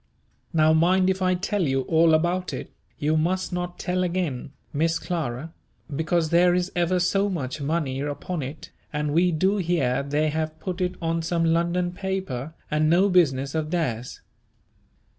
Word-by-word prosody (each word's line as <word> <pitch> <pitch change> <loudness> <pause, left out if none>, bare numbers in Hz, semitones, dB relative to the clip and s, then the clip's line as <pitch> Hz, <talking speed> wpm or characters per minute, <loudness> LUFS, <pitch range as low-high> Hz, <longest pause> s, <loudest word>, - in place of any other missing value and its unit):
Now 155 -1 +4
mind 185 +4 +4
if 190 0 -4
I 185 0 +3
tell 200 +3 -1
you 135 -5 +1
all 160 +3 +4
about 175 +3 0
it, - - -6 0.3
you 155 +2 +1
must 180 +4 0
not 175 0 -3
tell 180 0 -1
again, 170 -8 -2 0.2
Miss 165 +3 +1
Clara, 160 -3 -4 0.4
because 160 +1 0
there 175 +1 +5
is 180 +1 -1
ever 175 +1 +2
so 195 +3 +2
much 145 -6 -4
money 140 -3 -1
upon 145 +4 -3
it, 140 +4 -7 0.2
and 150 -1 -1
we 175 +3 +4
do 190 +6 +2
hear 165 -9 +1
they 145 +2 0
have 155 +1 -3
put 185 -1 -4
it 180 0 0
on 165 0 0
some 165 0 0
London 170 +2 +1
paper 180 -7 -4 0.2
and 155 0 +2
no 185 +5 +4
business 140 -7 +2
of 155 -1 -1
theirs. 125 -9 -2
165 Hz, 165 wpm, -25 LUFS, 150-180 Hz, 0.4 s, there